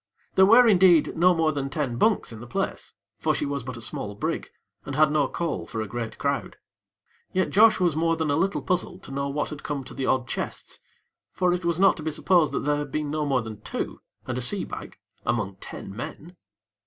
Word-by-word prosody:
There 190 0 +6
were, 235 +3 +7
indeed, 180 -6 +5
no 180 +2 +5
more 160 -1 +2
than 140 -2 -3
ten 135 -4 -2
bunks 215 - +2
in 110 - -9
the 120 - -9
place; 115 - -3 0.3
for - - +1
she - - -1
was 140 -2 -3
but 125 0 -6
a - - -8
small 105 -2 -5
brig, - - -3 0.3
and 135 - -5
had 155 0 +4
no 150 -3 +2
call 150 - -3
for 110 - -5
a 110 - -1
great 115 +2 -5
crowd. 140 0 -2 0.8
Yet 185 0 +1
Josh 220 +1 +6
was 175 -4 +2
more 165 +1 +2
than 160 -2 -1
a - - +2
little 190 +5 0
puzzled 180 0 -2
to - - -9
know 140 +1 -2
what 145 +2 -2
had 150 -1 -7
come 145 -2 -3
to - - -10
the 135 - -3
odd 130 -1 +1
chests; - - -5 0.5
for 180 -1 +1
it 180 0 -2
was 170 0 0
not 195 - +5
to - - -6
be 160 - -1
supposed 165 +1 +2
that - - -2
there 145 0 +1
had 145 -2 -4
been 150 0 -2
no 150 -1 -1
more 130 -4 +1
than 110 -2 -8
two - - -5 0.2
and - - -3
a - - -3
sea - - +1
bag - - -8 0.3
among 100 -5 -1
ten 95 0 -8
men. 155 +7 -8
150 Hz, 230 wpm, -25 LUFS, 130-170 Hz, 0.8 s, were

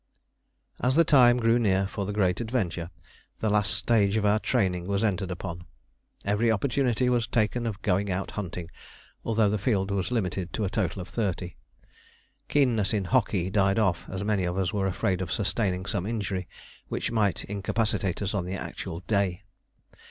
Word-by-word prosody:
As 130 +2 +1
the 165 - +6
time 125 -6 +6
grew 115 0 +3
near 95 -4 +2
for 100 0 -4
the - - -2
great 95 -1 +1
adventure, 95 -8 -2 0.5
the 110 - 0
last 105 0 +2
stage 105 -3 +2
of 105 - 0
our 105 +1 +4
training 95 -8 0
was 100 +1 0
entered 95 -3 0
upon. 90 -1 -5 0.6
Every 105 +3 +2
opportunity 125 +2 +1
was 120 -2 +2
taken 115 +1 0
of 105 -3 -4
going 100 +1 +1
out 95 +1 -2
hunting, 90 -4 -5 0.5
although 110 -2 +2
the 105 +1 0
field 100 -2 0
was 95 -2 -1
limited 95 -6 -2
to 110 - -1
a 95 - -2
total 95 -3 -1
of - - -12
thirty. 95 -3 -2 0.9
Keenness 120 -8 +2
in 100 -2 -1
hockey 95 -5 +1
died 100 0 +3
off, 95 -6 +1
as 95 +1 -4
many 105 -2 +1
of 90 +1 -1
us 95 +1 0
were 100 -2 +1
afraid 95 0 0
of 90 -3 -4
sustaining 95 -3 -1
some 100 -1 -2
injury 100 -5 -2 0.4
which - - -2
might 105 -4 +1
incapacitate 105 -1 -1
us 100 - -2
on 95 -4 -1
the 95 +2 -3
actual 85 -2 -6
day. 100 -2 0
100 Hz, 175 wpm, -27 LUFS, 95-110 Hz, 0.9 s, the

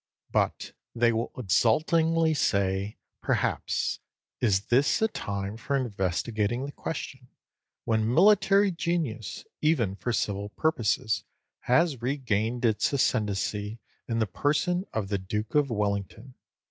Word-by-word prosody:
But - - 0 0.2
they 120 0 +3
will 115 +1 -2
exultingly 160 - +2
say, 100 -6 0 0.2
perhaps, - - 0 0.4
"Is 100 -5 +2
this 130 - +2
a 220 - +3
time 100 - -4
for 140 +5 -2
investigating 110 +1 -1
the 145 - -6
question, 130 -5 -6 0.6
when 110 0 +1
military 200 +4 +5
genius, 165 - -3 0.2
even 130 - +2
for 120 - -3
civil 100 -2 -1
purposes, 110 -5 0 0.4
has 135 0 +2
regained 120 -2 -1
its 110 -2 +2
ascendancy 105 -4 0 0.3
in 115 - -1
the 110 - +2
person 155 - 0
of 105 -3 -3
the 100 -1 0
Duke 105 +3 -4
of 145 -2 +3
Wellington? 105 +3 -2
115 Hz, 120 wpm, -27 LUFS, 105-145 Hz, 0.6 s, military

